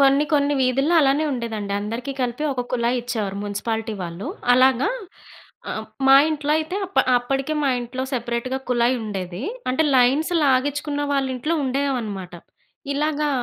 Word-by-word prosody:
కొన్ని 275 Hz, +1 st, +5 dB
కొన్ని 290 Hz, 0 st, +3 dB
వీధుల్లో 270 Hz, +6 st, +2 dB
అలానే 280 Hz, +2 st, +3 dB
ఉండేదండి. 220 Hz, -5 st, -4 dB
అందరికీ 230 Hz, +6 st, -4 dB
కలిపి 245 Hz, +4 st, -2 dB
ఒక 250 Hz, -2 st, -3 dB
కుళాయిచ్చేవారు 235 Hz, -4 st, -1 dB
మున్సిపాలిటీ 220 Hz, +2 st, -3 dB
వాళ్ళు. 170 Hz, +3 st, -6 dB, 0.3 s
అలాగా 260 Hz, 0 st, +4 dB, 0.8 s
ఆహ్, -, -, -4 dB, 0.2 s
మా 270 Hz, -, +8 dB
ఇంట్లో 300 Hz, -1 st, -1 dB
అయితే 315 Hz, +5 st, -3 dB
అప్ 385 Hz, -, -2 dB, 0.2 s
అప్పటికే 270 Hz, +5 st, -1 dB
మా 280 Hz, -, +2 dB
ఇంట్లో 245 Hz, +2 st, -5 dB
సెపరేట్‌గా 240 Hz, +1 st, -2 dB
కుళాయుండేది. 220 Hz, -6 st, -1 dB, 0.3 s
అంటే 260 Hz, +5 st, +2 dB
లైన్స్ 270 Hz, +7 st, +3 dB
లాగించుకున్న 285 Hz, +2 st, +1 dB
వాళ్లింట్లో 270 Hz, +3 st, 0 dB
ఉండేవనమాట. 245 Hz, -9 st, -2 dB, 0.6 s
ఇలాగా 300 Hz, 0 st, 0 dB
255 Hz, 125 wpm, -22 LUFS, 235-280 Hz, 0.8 s, మా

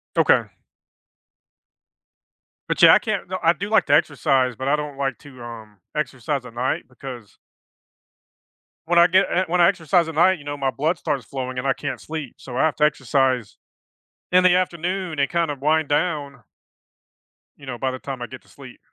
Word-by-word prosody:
Okay. -, -, +4 dB, 2.3 s
But -, -, -1 dB
yeah, -, -, +9 dB
I -, -, +6 dB
can't 215 Hz, -6 st, -3 dB
no, 185 Hz, 0 st, -3 dB
I 165 Hz, -, +5 dB
do 200 Hz, +5 st, -5 dB
like 220 Hz, -, +3 dB
to 145 Hz, -, +2 dB
exercise, 135 Hz, -4 st, +2 dB
but 130 Hz, +3 st, -5 dB
I 145 Hz, -, +3 dB
don't 150 Hz, -2 st, -5 dB
like 135 Hz, -2 st, -2 dB
to, 130 Hz, -4 st, -14 dB
um, 110 Hz, -3 st, -10 dB, 0.2 s
exercise 135 Hz, -2 st, -3 dB
at 120 Hz, -, -11 dB
night 125 Hz, +3 st, -1 dB
because 125 Hz, -4 st, -10 dB, 1.5 s
When 175 Hz, +1 st, +4 dB
I 170 Hz, -, +7 dB
get 190 Hz, +2 st, +4 dB
uh, 185 Hz, +1 st, +1 dB
when 175 Hz, +2 st, +1 dB
I 170 Hz, -, +7 dB
exercise 175 Hz, -2 st, +1 dB
at 160 Hz, -, -7 dB
night, 180 Hz, +2 st, +4 dB
you -, -, -13 dB
know, 145 Hz, 0 st, -5 dB
my 135 Hz, -1 st, 0 dB
blood 155 Hz, +6 st, -1 dB
starts 140 Hz, -7 st, -3 dB
flowing 130 Hz, -1 st, -5 dB
and 125 Hz, -, -3 dB
I 135 Hz, -, +3 dB
can't -, -, -5 dB
sleep, 155 Hz, -5 st, -6 dB
so, 125 Hz, -2 st, -8 dB
I 135 Hz, -, +3 dB
have 160 Hz, -, 0 dB
to 150 Hz, -, +1 dB
exercise 130 Hz, -5 st, +1 dB, 0.8 s
in 185 Hz, 0 st, +5 dB
the 180 Hz, -1 st, +6 dB
afternoon 180 Hz, -1 st, -2 dB
and 140 Hz, -, +1 dB
kind 170 Hz, -2 st, 0 dB
of 140 Hz, -2 st, -6 dB
wind 155 Hz, 0 st, +2 dB
down 145 Hz, -4 st, -1 dB, 1.2 s
you 140 Hz, -, -14 dB
know, 125 Hz, -2 st, -5 dB
by 130 Hz, +2 st, -1 dB
the 130 Hz, -, -6 dB
time 135 Hz, -2 st, -7 dB
I 120 Hz, -, -4 dB
get -, -, -11 dB
to -, -, -27 dB
sleep. -, -, -14 dB
145 Hz, 195 wpm, -22 LUFS, 130-170 Hz, 2.3 s, yeah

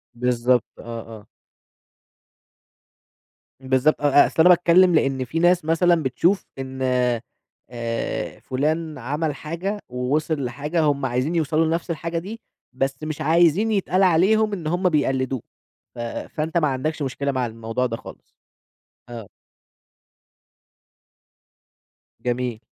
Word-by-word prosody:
بالضبط، 125 Hz, 0 st, +2 dB, 0.2 s
آه، -, -, -10 dB, 0.4 s
آه. 105 Hz, -, -21 dB, 2.3 s
بالضبط، 130 Hz, +3 st, +1 dB
أ -, -, -1 dB, 0.2 s
أ -, -, +1 dB
أصل -, -, -9 dB
أنا 175 Hz, +3 st, +7 dB
باتكلم 180 Hz, 0 st, +5 dB
لأن 135 Hz, -3 st, +1 dB
في 155 Hz, +7 st, -3 dB
ناس 175 Hz, -1 st, +3 dB
مثلًا 165 Hz, 0 st, +3 dB
بتشوف 170 Hz, +9 st, +1 dB
إن 130 Hz, 0 st, -6 dB, 0.9 s
آآ، 115 Hz, -1 st, -4 dB
فلان 155 Hz, +4 st, -2 dB
عمل 145 Hz, +4 st, -2 dB
حاجة، 180 Hz, +7 st, -4 dB
ووصل 135 Hz, +3 st, -1 dB
لحاجة، 145 Hz, +7 st, -2 dB
هُم 140 Hz, -2 st, +1 dB
عايزين 130 Hz, +6 st, -1 dB
يوصلوا 160 Hz, 0 st, +1 dB
لنفس 165 Hz, +2 st, -1 dB
الحاجة 165 Hz, +1 st, -3 dB
دي، 210 Hz, +7 st, -8 dB, 0.3 s
بس 135 Hz, +1 st, -1 dB
مش 155 Hz, 0 st, -4 dB
عايزين 170 Hz, +7 st, +3 dB
يتقال 195 Hz, -2 st, +1 dB
عليهم 200 Hz, +5 st, +3 dB
إن 175 Hz, -6 st, -4 dB
هُم 180 Hz, +3 st, +1 dB
بيقلدوه، 135 Hz, -5 st, 0 dB, 0.5 s
ف -, -, -10 dB
فأنت 155 Hz, +7 st, -3 dB
ما 155 Hz, -, +3 dB
عندكش 145 Hz, +4 st, -2 dB
مشكلة 140 Hz, +1 st, -2 dB
مع 130 Hz, -2 st, -1 dB
الموضوع 115 Hz, +2 st, -3 dB
ده 115 Hz, -2 st, -3 dB
خالص؟ -, -, -14 dB, 0.7 s
آه. 115 Hz, -4 st, -9 dB, 3.0 s
جميل. 120 Hz, -2 st, -1 dB
150 Hz, 120 wpm, -23 LUFS, 130-170 Hz, 3.0 s, أنا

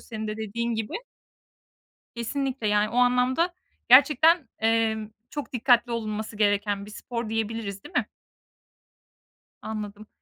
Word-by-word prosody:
senin 220 Hz, -2 st, -6 dB
de 215 Hz, -, -4 dB
dediğin 230 Hz, +2 st, -2 dB
gibi. 220 Hz, -1 st, -4 dB, 1.2 s
Kesinlikle, 255 Hz, 0 st, -2 dB
yani, 210 Hz, 0 st, +2 dB
o 240 Hz, -, -4 dB
anlamda 250 Hz, +7 st, +3 dB, 0.4 s
gerçekten, 285 Hz, +3 st, +6 dB
emm, 220 Hz, -1 st, +1 dB, 0.2 s
çok 290 Hz, -3 st, -6 dB
dikkatli 245 Hz, 0 st, +3 dB
olunması 215 Hz, -1 st, -3 dB
gereken 205 Hz, -1 st, +1 dB
bir 210 Hz, -, -11 dB
spor 235 Hz, +1 st, -5 dB
diyebiliriz, 220 Hz, -3 st, -3 dB
değil -, -, -13 dB
mi? -, -, 0 dB, 1.5 s
Anladım. 215 Hz, -1 st, -6 dB
225 Hz, 115 wpm, -26 LUFS, 215-250 Hz, 1.5 s, gerçekten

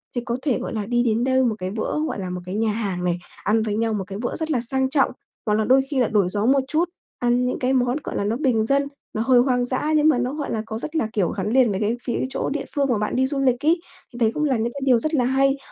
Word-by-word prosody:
thì 245 Hz, -, 0 dB
có 235 Hz, 0 st, -1 dB
thể, 270 Hz, -4 st, 0 dB
gọi -, -, -5 dB
là, 215 Hz, -2 st, -2 dB
đi 240 Hz, +2 st, +1 dB
đến 230 Hz, 0 st, +1 dB
đâu 260 Hz, 0 st, +3 dB
một 235 Hz, -4 st, +1 dB
cái 185 Hz, 0 st, -3 dB
bữa, 220 Hz, +7 st, -2 dB
gọi -, -, -4 dB
là, 185 Hz, -1 st, -4 dB
một 180 Hz, 0 st, -5 dB
cái 185 Hz, +2 st, -5 dB
nhà 220 Hz, 0 st, +1 dB
hàng 200 Hz, -5 st, -3 dB
này, 175 Hz, -1 st, 0 dB, 0.2 s
ăn 220 Hz, +2 st, +2 dB
với 210 Hz, -2 st, -2 dB
nhau 225 Hz, 0 st, 0 dB
một 205 Hz, -2 st, -2 dB
cái 195 Hz, 0 st, -6 dB
bữa 240 Hz, +3 st, -3 dB
rất 320 Hz, -1 st, -2 dB
là 250 Hz, -6 st, +1 dB
sang 265 Hz, +2 st, 0 dB
trọng, 275 Hz, 0 st, +2 dB, 0.3 s
hoặc 210 Hz, -, +1 dB
là 215 Hz, 0 st, +1 dB
đôi 260 Hz, +3 st, +5 dB
khi 275 Hz, -, 0 dB
là 245 Hz, -, +3 dB
đổi 205 Hz, -3 st, +2 dB
gió 205 Hz, +3 st, 0 dB
một 270 Hz, +2 st, +4 dB
chút, 325 Hz, +5 st, +1 dB, 0.3 s
ăn 245 Hz, +1 st, +2 dB
những 250 Hz, -, -2 dB
cái 255 Hz, +1 st, +1 dB
món, 250 Hz, 0 st, +2 dB
gọi -, -, -5 dB
là, -, -, 0 dB
nó 210 Hz, +3 st, 0 dB
bình 250 Hz, -6 st, +1 dB
dân, 280 Hz, +3 st, +2 dB, 0.3 s
nó 215 Hz, -, -1 dB
hơi 245 Hz, +1 st, +4 dB
hoang 245 Hz, -1 st, +2 dB
dã 265 Hz, +5 st, -1 dB
nhưng 305 Hz, 0 st, +4 dB
mà 290 Hz, -, +3 dB
nó, 250 Hz, +2 st, -1 dB
gọi 290 Hz, -2 st, -4 dB
là, 220 Hz, -1 st, -2 dB
có 220 Hz, 0 st, -5 dB
rất 305 Hz, +6 st, -5 dB
là, 275 Hz, -9 st, +1 dB
kiểu, 190 Hz, -5 st, +1 dB
gắn 200 Hz, 0 st, -3 dB
liền 255 Hz, -4 st, +4 dB
với 190 Hz, -, -2 dB
cái 215 Hz, +3 st, +1 dB
phía 240 Hz, -, -2 dB
chỗ -, -, -2 dB
địa 295 Hz, 0 st, -3 dB
phương 280 Hz, -1 st, +2 dB
mà 240 Hz, -, +2 dB
bạn 210 Hz, 0 st, -2 dB
đi 260 Hz, -, +3 dB
du 275 Hz, +1 st, -1 dB
lịch 260 Hz, 0 st, +1 dB
ấy, 335 Hz, +3 st, +4 dB, 0.3 s
thì -, -, -9 dB
đấy 225 Hz, -2 st, +3 dB
cũng 300 Hz, -, -1 dB
là 275 Hz, -5 st, +2 dB
những 230 Hz, +2 st, -2 dB
cái 280 Hz, -, -7 dB
điều 250 Hz, -3 st, +5 dB
rất 310 Hz, +6 st, 0 dB
là 255 Hz, -5 st, +2 dB
hay. 270 Hz, +2 st, +2 dB
245 Hz, 315 wpm, -23 LUFS, 220-270 Hz, 0.3 s, đôi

